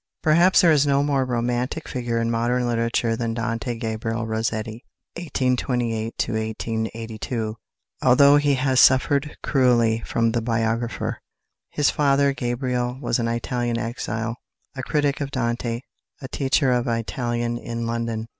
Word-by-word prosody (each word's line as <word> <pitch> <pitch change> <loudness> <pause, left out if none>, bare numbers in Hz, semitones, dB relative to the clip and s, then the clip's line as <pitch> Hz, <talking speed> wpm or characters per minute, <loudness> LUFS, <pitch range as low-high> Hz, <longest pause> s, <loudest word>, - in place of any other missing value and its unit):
Perhaps 170 +4 +5
there 170 - +5
is 145 -2 +3
no 140 0 +3
more 140 -2 +1
romantic 125 +4 -2
figure 120 -3 -2
in 115 0 0
modern 120 +2 0
literature 115 -1 0
than 115 -1 -2
=Dante 115 +1 -3
Gabriel 115 0 -3
Rossetti 110 +1 -3 0.3
(1828 125 -7 -1
1882)=, 110 0 -3 0.5
although 140 +3 +6
he 145 -1 +2
has 130 0 +2
suffered 140 +3 +3
cruelly 120 -4 +3
from 115 -1 0
the 120 0 0
biographer. 115 0 -2 0.5
His 145 - +1
father, 140 -1 +2
Gabriele, 125 -1 -2
was 125 -3 -1
an 115 - 0
Italian 120 0 -1
exile, 115 0 -3 0.4
a 130 - -4
critic 145 +1 0
of 140 - -2
Dante, 120 -2 -2 0.4
a 130 - -7
teacher 135 0 +1
of 125 0 +1
Italian 120 0 -2
in 115 -1 -4
London. 115 -1 -3
120 Hz, 135 wpm, -23 LUFS, 115-130 Hz, 0.5 s, although